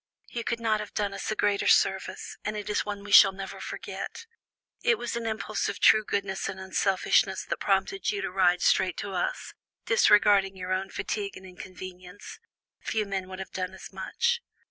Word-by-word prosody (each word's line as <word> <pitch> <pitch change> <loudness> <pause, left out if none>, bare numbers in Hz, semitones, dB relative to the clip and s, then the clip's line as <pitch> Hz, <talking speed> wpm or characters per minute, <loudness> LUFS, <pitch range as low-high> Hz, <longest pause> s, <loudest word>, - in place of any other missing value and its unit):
"You 235 - -4
could 235 0 -2
not 220 -2 +1
have 210 -1 -8
done 205 -1 -1
us - - -5
a 215 - -1
greater 205 -1 +1
service, - - +2
and 215 0 -3
it 210 0 -4
is 210 - +1
one 205 -1 -5
we 205 - -8
shall 195 -1 +9
never 195 0 -7
forget. 460 - -6 0.6
It 470 -1 +3
was 240 - -4
an 235 -1 -3
impulse 215 -1 -2
of 200 - -5
true 215 0 +6
goodness 195 -2 -2
and 190 -1 -6
unselfishness 190 0 +1
that - - -3
prompted 195 - 0
you 410 - -1
to - - -3
ride 180 -2 +3
straight 185 -2 +3
to 200 - -4
us, - - -3 0.3
disregarding 205 - +4
your 185 0 -3
own 190 +1 -2
fatigue 200 0 -4
and 190 - -12
inconvenience; 185 +1 -10 0.4
few 215 -1 -1
men 190 -2 -4
would 185 - -7
have 190 - -7
done 185 0 -4
as - - -11
much." 475 0 -1
200 Hz, 190 wpm, -27 LUFS, 190-215 Hz, 0.6 s, shall